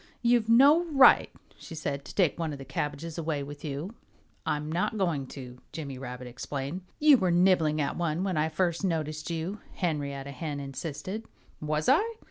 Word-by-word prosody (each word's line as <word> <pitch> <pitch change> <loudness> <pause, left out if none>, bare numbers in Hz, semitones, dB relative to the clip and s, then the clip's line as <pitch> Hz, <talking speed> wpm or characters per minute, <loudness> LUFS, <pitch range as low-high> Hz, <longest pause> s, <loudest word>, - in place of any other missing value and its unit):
"You've 235 -2 +3
no 280 +8 +7
right," 290 -5 +6 0.3
she 165 - -9
said, 140 -3 -3
"to - - -10
take 175 -5 +2
one 165 -2 -1
of - - -6
the 135 - -9
cabbages 150 +4 -4
away 155 -3 -2
with 145 +1 -9
you." 150 +7 -4 0.5
"I'm 150 +1 -1
not 180 +6 0
going 165 -9 0
to," 125 -2 -9
Jimmy 140 -5 -6
Rabbit 125 -1 -7
explained. 135 +6 -5 0.2
"You 300 -2 +7
were 185 -2 +2
nibbling 175 -3 +3
at 145 - -1
one 170 0 -1
when 190 -2 -1
I 155 +1 +1
first 170 +3 0
noticed 155 -3 -2
you," 170 +5 -3 0.2
Henrietta 140 -5 -2
Hen 145 +1 -4
insisted. 160 - -5 0.3
"Was 155 0 -1
I?" 425 - +3
155 Hz, 175 wpm, -28 LUFS, 140-185 Hz, 0.5 s, no